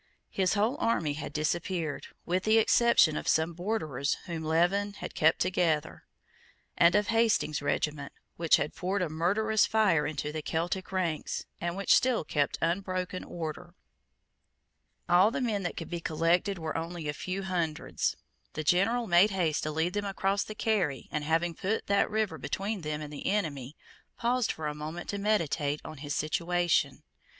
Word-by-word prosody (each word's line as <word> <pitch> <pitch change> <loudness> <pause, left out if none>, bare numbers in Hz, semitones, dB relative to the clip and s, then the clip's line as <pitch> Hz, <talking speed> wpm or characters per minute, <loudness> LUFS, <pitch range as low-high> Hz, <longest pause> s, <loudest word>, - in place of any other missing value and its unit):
His 190 +1 +1
whole 220 +7 +1
army 165 -10 +1
had 150 - -6
disappeared, 165 0 -2 0.2
with 185 +2 0
the 215 +1 +4
exception 225 -7 +5
of - - -4
some 160 +2 +2
Borderers 160 - -1
whom 165 -2 -5
Leven 175 +6 +1
had - - -7
kept 155 - +3
together, 170 -4 0 0.7
and 170 +2 +5
of 210 0 +2
Hastings's 225 -10 +2
regiment, 145 0 -1 0.2
which 165 -2 +4
had - - -2
poured 185 +1 -1
a 170 - -2
murderous 205 +7 +2
fire 190 -9 +3
into 150 0 -3
the 155 0 -4
Celtic 175 +5 -2
ranks, 175 -5 -2
and 170 +1 -3
which 200 - +3
still 255 -6 +2
kept 145 -1 0
unbroken 185 +1 -1
order. 170 +1 -6 1.3
All 180 +4 +5
the 265 +4 -3
men 225 -6 0
that 175 - -4
could 165 - -6
be 175 - -2
collected 170 +5 +1
were 160 -2 -4
only 165 -1 -4
a 150 - -1
few 185 +5 -4
hundreds. 170 -5 -1 0.4
The 155 - -3
general 200 +10 +2
made 180 +2 +5
haste 175 -6 0
to 155 - -2
lead 160 +3 0
them 205 0 -2
across 195 0 0
the 215 - -8
Carry, 190 -12 0
and, 150 - -2
having 165 +3 +1
put 200 +7 -2
that 200 0 +2
river 215 -1 -1
between 200 0 -3
them 150 -1 -3
and 150 0 -8
the 145 - -5
enemy, 150 -9 -2 0.4
paused 245 0 +1
for 160 - -6
a 150 - -1
moment 155 +4 -6
to 200 - -2
meditate 165 -8 0
on 155 - -8
his 145 +1 -4
situation. 175 +2 0
175 Hz, 170 wpm, -29 LUFS, 155-200 Hz, 1.3 s, exception